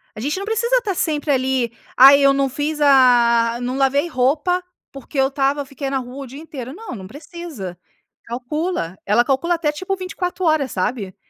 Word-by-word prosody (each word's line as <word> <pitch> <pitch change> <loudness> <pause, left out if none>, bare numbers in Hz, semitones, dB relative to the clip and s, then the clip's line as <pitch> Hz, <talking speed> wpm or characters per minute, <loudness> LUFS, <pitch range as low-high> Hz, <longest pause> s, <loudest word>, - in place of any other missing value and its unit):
a - - -8
gente 290 +9 -2
não 395 - -4
precisa 470 +3 0
estar 420 -7 -2
sempre 300 -2 -1
ali, 260 -3 0 0.3
ai 275 +2 +9
eu 275 0 +5
não 275 -1 +1
fiz 295 +3 -3
a 240 -4 +5
a 240 - -6
não 250 +2 -3
lavei 275 +4 +2
roupa, 300 +6 +1 0.3
porque 275 +1 -10
eu 265 - +4
estava 280 0 0
fiquei 275 0 -5
na 270 - -1
rua 260 +2 -7
o - - -9
dia 275 +4 -10
inteiro. 275 -5 -8
Não, 430 - -8
não 190 -2 -9
precisa. 290 - -8 0.5
Calcula, 245 - -3
ela 215 +5 +3
calcula 335 +7 +1
até 310 -3 0
tipo 375 +6 -3
24 365 0 -4
horas, 310 -5 +2
sabe? 190 0 -3
275 Hz, 190 wpm, -20 LUFS, 250-320 Hz, 0.5 s, ai